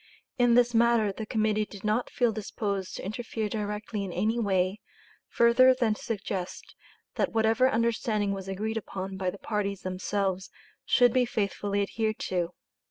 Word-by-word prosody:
In 245 Hz, -1 st, +5 dB
this 245 Hz, 0 st, +4 dB
matter 230 Hz, -2 st, +4 dB
the 215 Hz, +2 st, -6 dB
Committee 215 Hz, -2 st, +1 dB
did 200 Hz, -2 st, -11 dB
not 215 Hz, +3 st, 0 dB
feel 240 Hz, -2 st, +1 dB
disposed 200 Hz, -2 st, -3 dB
to -, -, -6 dB
interfere 220 Hz, +1 st, -3 dB
directly 210 Hz, 0 st, -3 dB
in 190 Hz, -, -5 dB
any 215 Hz, +7 st, 0 dB
way, 190 Hz, -2 st, +1 dB, 0.5 s
further 255 Hz, +2 st, +5 dB
than 235 Hz, -4 st, +2 dB
to -, -, -10 dB
suggest 195 Hz, -4 st, -4 dB, 0.4 s
that -, -, 0 dB
whatever 225 Hz, +3 st, +3 dB
understanding 220 Hz, -3 st, 0 dB
was 195 Hz, -1 st, -5 dB
agreed 215 Hz, +4 st, -2 dB
upon 195 Hz, -2 st, -5 dB
by 190 Hz, -1 st, -1 dB
the 200 Hz, -, -7 dB
parties 200 Hz, -2 st, -2 dB
themselves 190 Hz, 0 st, -2 dB, 0.4 s
should 245 Hz, -2 st, +4 dB
be 255 Hz, -1 st, +4 dB
faithfully 205 Hz, -2 st, -1 dB
adhered 220 Hz, +2 st, -2 dB
to. 180 Hz, -1 st, -2 dB
210 Hz, 160 wpm, -28 LUFS, 195-230 Hz, 0.5 s, In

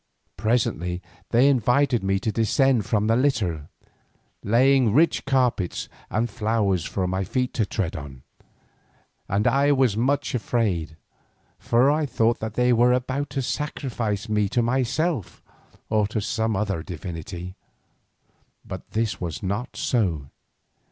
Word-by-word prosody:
Presently 100 Hz, -5 st, 0 dB, 0.3 s
they 120 Hz, +4 st, +4 dB
invited 130 Hz, -1 st, +2 dB
me 95 Hz, 0 st, +1 dB
to 110 Hz, -, -1 dB
descend 115 Hz, 0 st, +2 dB
from 105 Hz, -2 st, +1 dB
the 115 Hz, +1 st, +3 dB
litter, 105 Hz, -, 0 dB, 0.7 s
laying 125 Hz, +1 st, +4 dB
rich 160 Hz, +6 st, +3 dB
carpets 125 Hz, -9 st, 0 dB, 0.2 s
and 110 Hz, +3 st, 0 dB
flowers 105 Hz, -5 st, 0 dB
for 95 Hz, -, -2 dB
my 95 Hz, +1 st, -1 dB
feet 125 Hz, +5 st, -2 dB
to 110 Hz, -4 st, 0 dB
tread 95 Hz, -7 st, -2 dB
on, 70 Hz, -3 st, -8 dB, 1.1 s
and 100 Hz, +2 st, +1 dB
I 140 Hz, +1 st, +3 dB
was 130 Hz, -6 st, +3 dB
much 130 Hz, +6 st, 0 dB
afraid, 100 Hz, -10 st, -1 dB, 0.6 s
for 125 Hz, +4 st, +3 dB
I 150 Hz, 0 st, 0 dB
thought 115 Hz, -1 st, +1 dB
that 110 Hz, 0 st, -5 dB
they 125 Hz, 0 st, +3 dB
were 120 Hz, +1 st, +4 dB
about 130 Hz, +3 st, -1 dB
to 135 Hz, 0 st, -2 dB
sacrifice 120 Hz, -7 st, -3 dB
me 105 Hz, -2 st, +1 dB
to 120 Hz, +2 st, +1 dB
myself 130 Hz, -, -1 dB, 0.4 s
or 105 Hz, -2 st, +1 dB
some 110 Hz, +1 st, -1 dB
other 95 Hz, -4 st, -1 dB
divinity. 90 Hz, +1 st, -7 dB, 1.1 s
But -, -, -8 dB
this 110 Hz, -2 st, -1 dB
was 85 Hz, -1 st, -4 dB
not 100 Hz, +6 st, -3 dB
so. 85 Hz, -, 0 dB
115 Hz, 130 wpm, -24 LUFS, 95-125 Hz, 1.1 s, they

